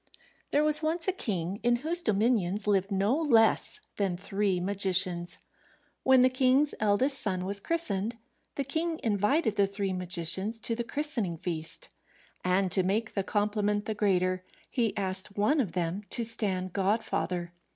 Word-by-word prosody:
There 295 Hz, -, +2 dB
was 305 Hz, 0 st, +2 dB
once 325 Hz, +2 st, -2 dB
a -, -, +4 dB
king 195 Hz, -, -3 dB
in 240 Hz, +1 st, +3 dB
whose 340 Hz, +2 st, +3 dB
dominions 210 Hz, -, +1 dB
lived 195 Hz, -2 st, +1 dB
no 200 Hz, +5 st, +2 dB
less 240 Hz, -9 st, +3 dB, 0.2 s
than 195 Hz, -4 st, 0 dB
three 195 Hz, 0 st, -1 dB
magicians. 185 Hz, -2 st, +2 dB, 0.6 s
When 260 Hz, -1 st, +5 dB
the -, -, +7 dB
king's 260 Hz, +3 st, +3 dB
eldest 215 Hz, +7 st, +2 dB
son 185 Hz, -3 st, -1 dB
was 200 Hz, +1 st, 0 dB
christened, 230 Hz, -, -2 dB, 0.4 s
the 280 Hz, -, -1 dB
king 320 Hz, +4 st, -2 dB
invited 215 Hz, -, +1 dB
the 200 Hz, -1 st, +4 dB
three 195 Hz, -1 st, -3 dB
magicians 180 Hz, +4 st, +1 dB
to 230 Hz, -, -2 dB
the 235 Hz, -, -2 dB
christening 235 Hz, -, -2 dB
feast, 160 Hz, -1 st, -4 dB, 0.6 s
and 185 Hz, +1 st, +1 dB
to 190 Hz, -, +2 dB
make 210 Hz, +5 st, -1 dB
the 200 Hz, -, 0 dB
compliment 205 Hz, 0 st, 0 dB
the 220 Hz, -, -2 dB
greater, 185 Hz, -3 st, +1 dB, 0.3 s
he 230 Hz, -5 st, 0 dB
asked 195 Hz, +1 st, -3 dB
one 275 Hz, +9 st, +3 dB
of 190 Hz, -10 st, -4 dB
them 175 Hz, +2 st, -2 dB
to 235 Hz, -, -2 dB
stand 190 Hz, -5 st, -2 dB
godfather. 185 Hz, -3 st, -1 dB
205 Hz, 155 wpm, -29 LUFS, 185-240 Hz, 0.6 s, the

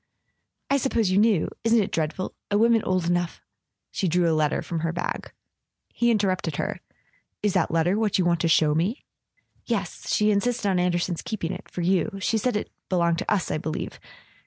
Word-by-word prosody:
"I 280 Hz, -, +5 dB
supposed 230 Hz, -7 st, +1 dB
you 190 Hz, -, +4 dB
knew. 210 Hz, -6 st, +3 dB, 0.2 s
Isn't 230 Hz, 0 st, +4 dB
it 200 Hz, -, 0 dB
dreadful? 165 Hz, +3 st, -2 dB, 0.2 s
A 205 Hz, -, +2 dB
woman 230 Hz, +1 st, +4 dB
old 185 Hz, -3 st, 0 dB
enough 175 Hz, 0 st, 0 dB, 0.3 s
" -, -, -58 dB
She 195 Hz, -, -1 dB
drew 175 Hz, +1 st, +2 dB
a 165 Hz, -, +3 dB
letter 155 Hz, -1 st, +1 dB
from 170 Hz, -, -3 dB
her 165 Hz, +1 st, -1 dB
bag. 175 Hz, +1 st, -4 dB, 0.6 s
He 240 Hz, -, +2 dB
interrupted 190 Hz, -8 st, +1 dB
her. -, -, -3 dB, 0.6 s
"Is 205 Hz, -3 st, +2 dB
that 180 Hz, -4 st, +2 dB
letter 170 Hz, +5 st, +2 dB
what 215 Hz, -3 st, +1 dB
you 185 Hz, -, +2 dB
want 170 Hz, -1 st, +2 dB
to 170 Hz, -, +1 dB
show 155 Hz, -2 st, +4 dB
me? 185 Hz, -, -1 dB, 0.3 s
" -, -, -40 dB
"Yes. -, -, -3 dB
She 210 Hz, -1 st, +3 dB
insisted 225 Hz, +2 st, 0 dB
on 190 Hz, -2 st, +2 dB
Anderson's 175 Hz, -1 st, 0 dB
keeping 185 Hz, -6 st, -3 dB
it—for 180 Hz, -, -7 dB
you. 190 Hz, +3 st, +1 dB
She 220 Hz, +4 st, +1 dB
said 245 Hz, +1 st, 0 dB
it 210 Hz, -, -3 dB, 0.2 s
belonged 170 Hz, -2 st, +2 dB
to -, -, -3 dB
us, 200 Hz, -4 st, +1 dB
I -, -, -1 dB
believe. 155 Hz, 0 st, -4 dB
185 Hz, 200 wpm, -25 LUFS, 170-210 Hz, 0.6 s, I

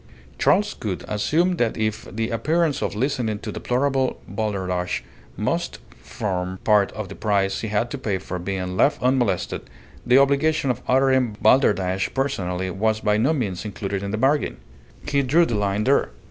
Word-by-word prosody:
Charles -, -, +3 dB
Gould -, -, -5 dB
assumed 165 Hz, -, +1 dB
that 115 Hz, -2 st, +1 dB
if 110 Hz, -1 st, -2 dB
the 115 Hz, +4 st, -2 dB
appearance 155 Hz, +5 st, +1 dB
of -, -, -2 dB
listening 120 Hz, -3 st, -1 dB
to -, -, -6 dB
deplorable 130 Hz, +1 st, 0 dB
balderdash 95 Hz, -3 st, -2 dB, 0.3 s
must -, -, -1 dB, 0.2 s
form 95 Hz, -2 st, -3 dB
part 105 Hz, -2 st, +3 dB
of 110 Hz, -2 st, -5 dB
the 95 Hz, -, -8 dB
price 100 Hz, -2 st, 0 dB
he 110 Hz, -, -3 dB
had 105 Hz, +3 st, -1 dB
to 140 Hz, -, -4 dB
pay 105 Hz, -6 st, -1 dB
for 90 Hz, 0 st, -6 dB
being 90 Hz, 0 st, -3 dB
left 140 Hz, -, +3 dB
unmolested, 125 Hz, -4 st, +1 dB, 0.4 s
the 125 Hz, +2 st, +5 dB
obligation 140 Hz, +1 st, +3 dB
of 125 Hz, -, -5 dB
uttering 130 Hz, -4 st, +2 dB
balderdash 95 Hz, -7 st, +3 dB
personally 95 Hz, -9 st, -1 dB
was 110 Hz, +4 st, 0 dB
by 105 Hz, 0 st, +2 dB
no 125 Hz, +8 st, +2 dB
means 105 Hz, -, -2 dB
included 100 Hz, -2 st, -4 dB
in 100 Hz, -, -4 dB
the 110 Hz, -, -2 dB
bargain. 140 Hz, +6 st, +1 dB, 0.5 s
He 140 Hz, -, +2 dB
drew 155 Hz, +6 st, +4 dB
the 120 Hz, -, -3 dB
line 105 Hz, 0 st, 0 dB
there. 135 Hz, -, +3 dB
110 Hz, 165 wpm, -23 LUFS, 100-135 Hz, 0.5 s, the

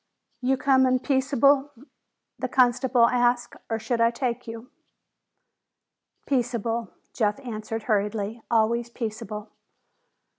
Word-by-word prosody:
"You 260 Hz, +1 st, +1 dB
comin' 260 Hz, -1 st, +3 dB
peaceable?" 275 Hz, +1 st, +2 dB, 0.7 s
the -, -, -1 dB
constable 250 Hz, -1 st, +3 dB
asked. 240 Hz, 0 st, +1 dB
"Or 225 Hz, -, 0 dB
should 230 Hz, +1 st, -2 dB
I 230 Hz, -, +5 dB
take 240 Hz, 0 st, -3 dB
you!" 230 Hz, +2 st, -8 dB, 1.5 s
"Peaceable," 235 Hz, -3 st, -1 dB, 0.2 s
Jeff 210 Hz, -1 st, 0 dB
answered 225 Hz, -2 st, -5 dB
hurriedly. 210 Hz, +1 st, -1 dB
"Always 235 Hz, +1 st, +2 dB
peaceable." 220 Hz, -2 st, -6 dB
235 Hz, 100 wpm, -25 LUFS, 225-255 Hz, 1.5 s, I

